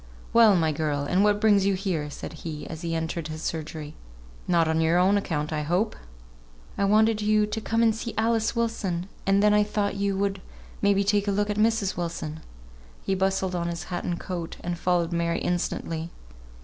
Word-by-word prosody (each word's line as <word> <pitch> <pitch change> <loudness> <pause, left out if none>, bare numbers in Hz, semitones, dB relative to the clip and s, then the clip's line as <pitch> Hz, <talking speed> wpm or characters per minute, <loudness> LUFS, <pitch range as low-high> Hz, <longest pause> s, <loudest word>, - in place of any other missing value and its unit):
"Well, 225 -3 +7
my 160 -3 +2
girl! 150 -1 -1
and 180 +7 +2
what 205 0 +3
brings 210 -2 +4
you 200 - +2
here?" 180 -6 -2
said 145 - -7
he, 155 -3 -6
as 160 0 -7
he 165 -1 -2
entered 160 0 -3
his 155 0 -7
surgery. 155 -1 -4 0.5
"Not 170 -2 +3
on 160 0 +1
your 165 +2 +3
own 185 +3 +4
account, 160 -6 -1
I 155 - -1
hope." 175 +8 0 0.8
"I 200 - +1
wanted 215 +1 +3
you 210 0 +3
to 215 +1 -4
come 225 +1 +1
and 225 -1 +4
see 230 +1 -5
Alice 225 +1 +1
Wilson, 200 -7 -1 0.2
and 195 +1 +4
then 210 0 +5
I 210 0 +5
thought 205 -1 -1
you 200 -1 0
would 195 -1 -1 0.4
may 200 0 +4
be 200 - +2
take 205 0 +1
a - - +2
look 205 +1 0
at 205 - -3
Mrs. 215 -3 +1
Wilson." 165 -3 -4 0.6
He 195 - 0
bustled 190 0 0
on 170 -1 -1
his 170 -1 -4
hat 175 - -2
and 175 -1 -2
coat, 175 -3 -5
and 175 0 -3
followed 175 -1 0
Mary 170 0 0
instantly. 165 -2 -2
185 Hz, 200 wpm, -26 LUFS, 165-210 Hz, 0.8 s, Well